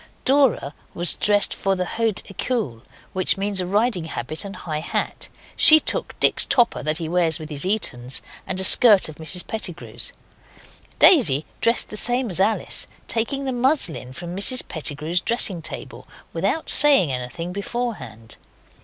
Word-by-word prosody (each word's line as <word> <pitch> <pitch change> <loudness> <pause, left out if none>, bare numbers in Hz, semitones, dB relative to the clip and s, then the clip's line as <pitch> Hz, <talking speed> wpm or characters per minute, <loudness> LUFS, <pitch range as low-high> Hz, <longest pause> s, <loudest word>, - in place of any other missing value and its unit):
Dora 265 - +1 0.2
was 175 +1 +1
dressed 205 0 +1
for 195 0 -2
the 185 -1 -3
Haute 225 +1 -2
ecole, 195 - -4 0.3
which 185 +1 0
means 195 -1 -2
a 180 - -5
riding 205 -2 -1
habit 155 0 -4
and 200 -1 -8
a - - -12
high 155 -4 -5
hat. 155 - -4 0.3
She 315 0 +9
took - - -4
Dick's - - +3
topper 240 -3 +1
that 155 +1 -1
he 165 -2 -5
wears 165 -1 +1
with 155 -2 -10
his 145 +3 -1
Etons, 130 - -2 0.3
and 185 - -3
a - - 0
skirt 205 -3 +6
of 155 - -12
Mrs 170 +3 -1
Pettigrew's. 195 -6 -4 0.9
Daisy, 155 - +5
dressed 230 0 +2
the 210 - -6
same 245 0 -1
as 180 - -1
Alice, 215 +3 -1 0.2
taking 270 +5 -3
the 265 - -2
muslin 245 - -1
from 175 +6 -8
Mrs 250 +6 +4
Pettigrew's 160 +2 -3
dressing 200 -7 +2
table - - -7 0.3
without 195 - -2
saying 275 - +5
anything 130 +8 -6
beforehand. 200 - -6
190 Hz, 160 wpm, -21 LUFS, 160-230 Hz, 0.9 s, She